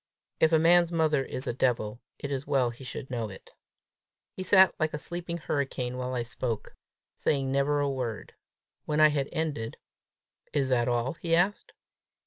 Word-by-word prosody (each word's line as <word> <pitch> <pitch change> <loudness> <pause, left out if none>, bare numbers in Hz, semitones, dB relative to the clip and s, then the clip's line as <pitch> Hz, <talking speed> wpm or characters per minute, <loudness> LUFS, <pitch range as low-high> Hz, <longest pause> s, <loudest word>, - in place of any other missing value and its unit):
If 160 - +4
a 160 - +6
man's 170 +1 +5
mother 155 -4 +2
is 130 0 -1
a - - -1
devil, 120 -3 0 0.2
it 140 - -5
is 135 0 -3
well 130 -4 +2
he 120 +3 -12
should 130 +1 -7
know 115 -3 -2
it. 95 - -12 0.8
He - - -6
sat 190 0 +6
like 155 -1 0
a - - -2
sleeping 170 +2 -4
hurricane 135 -5 -2
while 125 0 -3
I 120 - -1
spoke, 115 -1 -4 0.4
saying 135 -2 0
never 140 +2 +2
a 145 - +1
word. 125 -5 -4 0.5
When 150 0 0
I 155 0 +8
had 145 -2 -1
ended, 150 -9 -3 0.8
"Is 135 -2 +1
that 125 -1 +2
all?" 120 +2 0
he 165 -1 +2
asked. 185 +5 +1
140 Hz, 175 wpm, -28 LUFS, 125-160 Hz, 0.8 s, I